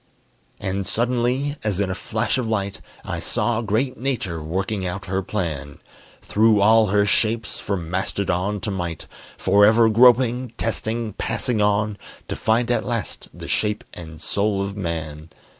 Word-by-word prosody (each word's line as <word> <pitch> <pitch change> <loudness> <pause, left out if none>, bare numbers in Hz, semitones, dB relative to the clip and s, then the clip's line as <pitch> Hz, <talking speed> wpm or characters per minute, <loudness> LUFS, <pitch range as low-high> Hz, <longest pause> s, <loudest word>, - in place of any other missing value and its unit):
And 95 0 -2
suddenly, 125 +4 0
as 105 -3 0
in 100 -2 0
a - - 0
flash 110 +5 -1
of 120 - -2
light, 100 -3 -2 0.2
I - - -3
saw 120 -1 0
great 120 +4 -1
Nature 115 -11 -2
working 95 +5 -2
out 90 +1 -4
her 95 0 -1
plan; 80 -8 -4 0.5
Through 110 0 +4
all 110 +2 +5
her 100 +1 +3
shapes, 110 +1 0
from 90 -5 -3
mastodon 95 +1 -1
to 105 - -2
mite, 85 -4 -4 0.3
Forever 105 +4 +5
groping, 125 +1 +4
testing, 115 -1 -2
passing 115 +1 -1
on 105 0 +1 0.3
To - - -2
find 115 +2 +1
at 120 - +1
last 115 -4 -4
the - - -9
shape 105 -1 0
and 80 -2 -9
soul 100 +3 0
of 100 0 -4
Man. 80 -4 -4
105 Hz, 150 wpm, -22 LUFS, 95-115 Hz, 0.5 s, all